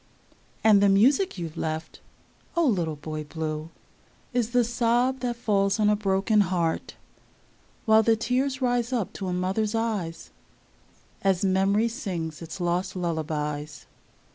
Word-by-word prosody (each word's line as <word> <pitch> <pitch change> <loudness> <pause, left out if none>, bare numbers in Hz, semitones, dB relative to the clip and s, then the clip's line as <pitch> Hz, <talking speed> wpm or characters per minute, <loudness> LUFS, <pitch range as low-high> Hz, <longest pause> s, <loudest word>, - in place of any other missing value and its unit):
And 210 -2 +6
the 200 - +5
music 255 - +3
you've 165 -2 -5
left, 160 0 -4 0.6
O 340 - +4
Little 175 - +1
Boy 155 +1 -6
Blue, 155 0 -4 0.6
Is 240 -2 +1
the 245 0 +3
sob 240 +2 +1
that 245 -1 -2
falls 200 -3 +1
on 210 -1 +4
a - - +3
broken 200 +1 +2
heart, 175 -4 -1 0.9
While 220 -1 +6
the 225 +1 +3
tears 260 +4 -1
rise 245 -1 +1
up 235 -7 -1
to 190 - -5
a - - -1
mother's 195 +5 -1
eyes 210 -8 -3 0.9
As 195 -1 +2
memory 195 +4 +2
sings 170 -8 -4
its 165 +2 -8
lost 175 +2 -1
lullabies. 150 -4 -3
195 Hz, 140 wpm, -26 LUFS, 170-230 Hz, 0.9 s, And